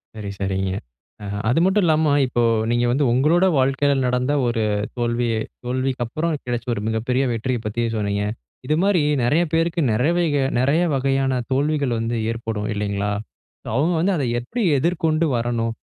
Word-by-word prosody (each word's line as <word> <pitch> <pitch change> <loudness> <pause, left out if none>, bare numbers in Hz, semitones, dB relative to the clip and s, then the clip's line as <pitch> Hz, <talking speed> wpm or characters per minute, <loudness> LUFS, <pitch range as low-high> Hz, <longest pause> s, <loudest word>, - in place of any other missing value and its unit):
சரி, 105 -2 -6
சரிங்க. 95 -1 -1 0.5
அ - - -6 0.2
அது 130 - +3
மட்டும் 190 +2 +3
இல்லாம, 155 -1 +3 0.2
இப்போ 120 -1 0 0.3
நீங்க 120 0 +2
வந்து 140 +2 +2
உங்களோட 155 +8 +3
வாழ்க்கையில 135 +2 +2
நடந்த 125 +2 0 0.2
ஒரு 115 -2 0 0.3
தோல்வி 120 0 0 0.4
தோல்விக்கு 130 0 -1
அப்புறம் 160 +8 -2
கிடைச்ச 120 -1 -3
ஒரு 105 - -3
மிகப்பெரிய 120 +4 0
வெற்றிய 120 +2 -2
பத்தி 110 +3 -2
சொன்னீங்க. 100 -1 -1 0.4
இது 150 - +1
மாரி 195 -4 +3 0.2
நெறய 150 +8 +3
பேருக்கு 165 +1 +1
நெறவைக 155 +5 +1 0.2
நெறய 140 +7 +2
வகையான 135 0 +1 0.2
தோல்விகள் 140 -2 +1
வந்து 115 +1 -2 0.2
ஏற்படும் 115 -2 -4
இல்லைங்களா? 100 0 -2 0.5
ஸோ - - -13
அவுங்க 160 +7 +2
வந்து 195 +4 +2
அத 140 - -1 0.2
எப்டி 225 - -5 0.2
எதிர்கொண்டு 160 +1 +1
வரணும்? 115 -1 -1
130 Hz, 150 wpm, -22 LUFS, 115-155 Hz, 0.5 s, அது